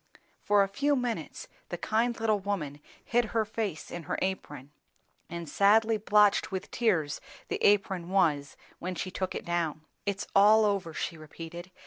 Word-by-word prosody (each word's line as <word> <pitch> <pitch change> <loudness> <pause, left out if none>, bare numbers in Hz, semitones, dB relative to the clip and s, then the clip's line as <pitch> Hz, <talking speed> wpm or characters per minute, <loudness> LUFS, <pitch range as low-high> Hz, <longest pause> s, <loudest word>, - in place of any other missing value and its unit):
For 205 -1 +4
a - - 0
few 285 +9 +1
minutes 250 - -3 0.2
the - - -3
kind 230 +2 0
little 220 -2 +2
woman 175 -8 -3 0.3
hid 240 0 +2
her 220 - +3
face 210 -7 -4
in 175 - -5
her - - 0
apron, 145 -7 -4 0.6
and 170 -1 -6
sadly 220 +7 +4
blotched 210 -2 +3
with 190 0 -5
tears 180 -11 +1 0.3
the - - -3
apron 190 -4 +3
was 155 -7 +1 0.2
when 185 +1 -4
she 185 +3 -4
took 185 -1 -3
it - - -5
down. 165 -3 -2 0.2
"It's 200 0 -1
all 215 +2 +7
over," 195 -5 0
she 165 - -3
repeated. 165 +3 -9
195 Hz, 160 wpm, -29 LUFS, 170-215 Hz, 0.6 s, all